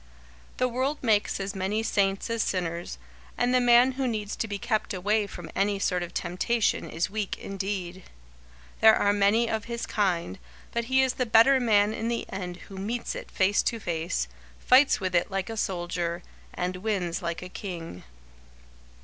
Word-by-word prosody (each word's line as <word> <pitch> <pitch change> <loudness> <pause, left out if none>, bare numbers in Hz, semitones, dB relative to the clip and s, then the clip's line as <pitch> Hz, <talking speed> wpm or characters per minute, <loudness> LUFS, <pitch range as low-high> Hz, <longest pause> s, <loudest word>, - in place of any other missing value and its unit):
The 255 - +2
world 260 +4 -1
makes 215 -4 +2
as 195 0 -3
many 200 +3 -1
saints 195 0 0
as 230 -1 0
sinners, 170 - -2 0.4
and 245 +1 +1
the 255 - +4
man 245 +1 +6
who 265 0 -2
needs 215 -3 -3
to 225 - -2
be 205 -1 -3
kept 215 -2 -1
away 205 +3 +1
from 175 -3 -9
any 200 +1 +1
sort 180 -2 0
of 175 - -5
temptation 195 +6 0
is 165 +3 -2
weak 210 -2 -3
indeed. 190 -2 -4 0.8
There 220 0 +8
are 205 - +2
many 205 +3 +3
of 220 -2 -2
his 235 0 -4
kind, 175 - -1 0.3
but 235 0 -1
he 260 +2 +3
is 260 -1 +1
the 255 - -2
better 230 +5 +6
man 215 -3 +3
in 225 +1 -3
the 235 0 -1
end 180 -2 -5
who 195 - -10
meets 230 +5 -3
it - - -7
face 200 +1 +2
to 230 - -1
face, 165 - -2 0.3
fights 270 +3 +5
with 185 -2 -2
it 175 0 +2
like 195 +1 -3
a - - -5
soldier, 175 -3 -2 0.3
and 180 +1 -3
wins 185 -3 -2
like 170 0 -3
a - - -6
king. 170 - -7
205 Hz, 180 wpm, -27 LUFS, 180-230 Hz, 0.8 s, There